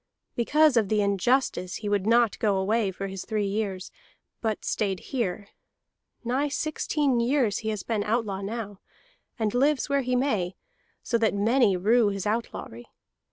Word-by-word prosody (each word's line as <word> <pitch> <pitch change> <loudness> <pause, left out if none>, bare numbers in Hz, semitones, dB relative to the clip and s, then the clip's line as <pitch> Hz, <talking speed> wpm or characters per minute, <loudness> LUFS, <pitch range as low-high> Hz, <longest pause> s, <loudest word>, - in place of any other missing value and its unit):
Because 295 +3 +3
of 215 -4 +2
the 210 -1 +2
injustice 200 -2 +1
he 210 - -5
would 205 -1 0
not 235 -1 +3
go 205 -3 +2
away 205 +2 +1
for 190 +1 -5
his 195 -1 -5
three 215 -2 -1
years, 195 -2 -3 0.5
but 220 -2 -2
stayed 195 -3 -1
here. 205 -5 -2 0.7
Nigh 260 +5 0
sixteen 290 -3 0
years 235 -3 +1
he 220 - -3
has 210 -3 -3
been 220 -3 -1
outlaw 210 -3 -1
now, 205 -1 -5 0.6
and 215 -2 -1
lives 280 +3 +2
where 280 0 +2
he 250 -1 -1
may, 215 -9 0 0.5
so 235 - 0
that 220 -2 +2
many 215 -1 +3
rue 220 +5 +3
his 195 -2 -4
outlawry. 210 - -4
220 Hz, 160 wpm, -26 LUFS, 200-245 Hz, 0.7 s, Because